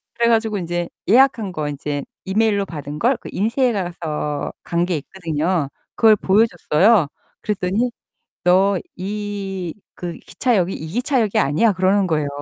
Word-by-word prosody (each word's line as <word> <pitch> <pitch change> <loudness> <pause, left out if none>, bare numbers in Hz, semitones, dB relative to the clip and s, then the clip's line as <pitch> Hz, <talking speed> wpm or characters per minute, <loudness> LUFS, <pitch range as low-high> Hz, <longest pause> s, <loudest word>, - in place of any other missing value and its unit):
그래 235 0 +2
가지고 220 -2 +2
인제 175 -1 -3 0.2
예약한 235 -3 +4
거 155 -4 -3
인제 145 0 -3 0.2
이메일로 205 0 +2
받은 150 -4 -7
걸 245 +2 +2
그 - - -10
인쇄해 230 +5 +1
가서 160 -6 -3
간 170 0 0
게 175 -2 -1
있거든요. 160 -1 -2 0.3
그걸 220 -2 +6
보여줬어요. 195 -2 +3 0.3
그랬더니 210 +4 0 0.5
"너 190 +2 +4 0.2
이 195 -2 -4 0.2
그 175 -1 -5
기차역이 195 -6 0
이 160 - -6
기차역이 240 - +1
아니야." 160 +11 +3
그러는 190 +1 +2
거예요. 155 -4 0
190 Hz, 310 characters per minute, -21 LUFS, 170-215 Hz, 0.5 s, 그걸